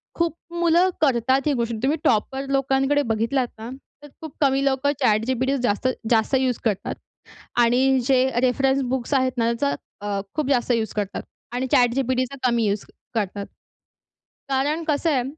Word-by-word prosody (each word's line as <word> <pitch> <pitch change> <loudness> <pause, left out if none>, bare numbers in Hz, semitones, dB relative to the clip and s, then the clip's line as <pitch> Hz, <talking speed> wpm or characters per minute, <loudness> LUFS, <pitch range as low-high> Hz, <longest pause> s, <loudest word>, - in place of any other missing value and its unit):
खूप 335 -1 0 0.2
मुलं 345 +2 +4
करतात 260 -1 +2
ही 295 - +2
गोष्टी. 235 -2 -2
तुम्ही 295 +4 +2
टॉपर 265 +5 +1
लोकांकडे 270 +1 +2
बघितलात 240 +4 0
ना, 225 +2 -7 0.3
तर - - -10
खूप 315 -3 -8
कमी 275 -1 +3
लोकं 275 +1 +1
ChatGPT 255 +5 +1
जास्त 210 +3 +1 0.2
जास्त 225 +3 +2
यूज 255 -3 0
करतात 210 -4 -1 0.7
आणि 260 +3 +3
जे 260 -1 +4 0.2
रेफरन्स 265 +2 +2
बुक्स 260 +1 -2
आहेत 260 -1 +2
ना, 230 0 +2
त्याचा 280 +4 0 0.3
अ, 200 -1 -1
खूप 305 -3 -1
जास्त 250 -2 +1
यूज 225 -3 0
करतात 205 -2 -3 0.3
आणि 250 +2 -2
ChatGPTचा 255 +1 +2
कमी 235 -2 +1
यूज 200 0 -1 0.3
करतात. 200 -1 -2 1.0
कारण 290 +5 0
कसं 305 +2 +1
आहे 255 -3 +1
260 Hz, 150 wpm, -23 LUFS, 235-275 Hz, 1.0 s, मुलं